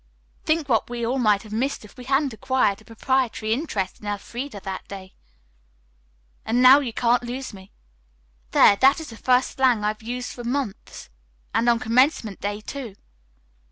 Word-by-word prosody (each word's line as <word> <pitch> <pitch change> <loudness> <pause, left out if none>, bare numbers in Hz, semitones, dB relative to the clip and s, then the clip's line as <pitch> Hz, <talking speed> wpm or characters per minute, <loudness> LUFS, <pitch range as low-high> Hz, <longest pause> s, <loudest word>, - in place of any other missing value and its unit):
"Think 315 -2 +1
what 230 -4 +1
we 240 -1 -3
all 255 +3 -1
might 210 -4 +2
have 215 -1 -10
missed 250 0 -2
if 210 - -17
we 250 -1 -11
hadn't 270 0 +1
acquired 255 -4 0
a - - -21
proprietary 230 -1 -1
interest 220 - -3
in 210 - -10
Elfreda 215 +4 -5
that 190 -1 -6
day." 190 -1 -10 1.3
"And 235 +2 0
now 255 +2 +8
you 265 -5 -3
can't 240 +1 +2
lose 245 +1 -6
me. 190 -1 -13 0.8
There, 200 - +6
that 270 +7 +4
is 315 -6 -8
the - - -10
first 250 +2 +2
slang 250 -5 +3
I've 215 +1 -2
used 245 +2 -5
for 240 - -8
months, 245 -4 -4 0.4
and 235 - +2
on 235 - +4
commencement 230 - +1
day, 205 +1 -3
too." 240 -3 -7
240 Hz, 170 wpm, -23 LUFS, 215-260 Hz, 1.3 s, now